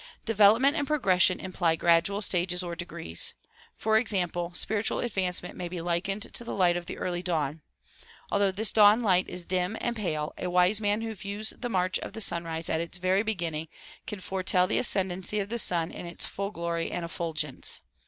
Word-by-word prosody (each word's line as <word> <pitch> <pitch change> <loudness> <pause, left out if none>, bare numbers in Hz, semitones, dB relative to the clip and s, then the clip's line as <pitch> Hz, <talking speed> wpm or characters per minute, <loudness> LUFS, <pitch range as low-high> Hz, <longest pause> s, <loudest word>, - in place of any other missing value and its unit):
Develop 215 +2 +5
ment 280 +2 +4
and 290 -3 -1
progression 185 - +3
imply 175 -3 0
gradual 170 +5 +3
stages 180 -1 +2
or 170 -1 -5
degrees. 170 - -3 0.4
FOr 220 0 +2
ex 225 0 +1
ample, 175 -1 -1
spiritual 210 +3 +1
advancement 190 -6 -2
may 180 - -5
be 175 0 -5
likened 175 +4 -2
to - - -3
the 235 - -5
light 180 -3 +3
of 175 -1 -4
the - - -6
early 175 -1 -3
dawn. 160 -4 -2 0.7
Although 200 -1 +3
this 210 +2 +2
dawn 210 +1 +6
light 185 -3 +3
is 180 -1 -6
dim 185 +4 -1
and 240 -1 -2
pale 155 -8 -2
a 180 - -2
wise 180 +4 +3
man 205 +1 +1
who 225 0 -4
views 205 +1 -3
the 245 - -5
march 185 -3 +1
of - - -7
the - - -6
sunrise 165 -3 -1
at 160 - 0
its 170 +1 -5
very 185 +2 +2
beginning 170 -7 -2 0.4
can 210 - -5
fore 190 0 -4
tell 185 0 +3
the - - +1
ascendency 190 -2 0
of 200 0 -3
the 235 +1 -1
sun 170 -5 +1
in 175 - -7
its 170 - -4
full 200 0 -4
glory 170 -3 -2
and 175 - -3
effulgence. 160 -4 -2
185 Hz, 200 wpm, -28 LUFS, 170-205 Hz, 0.7 s, dawn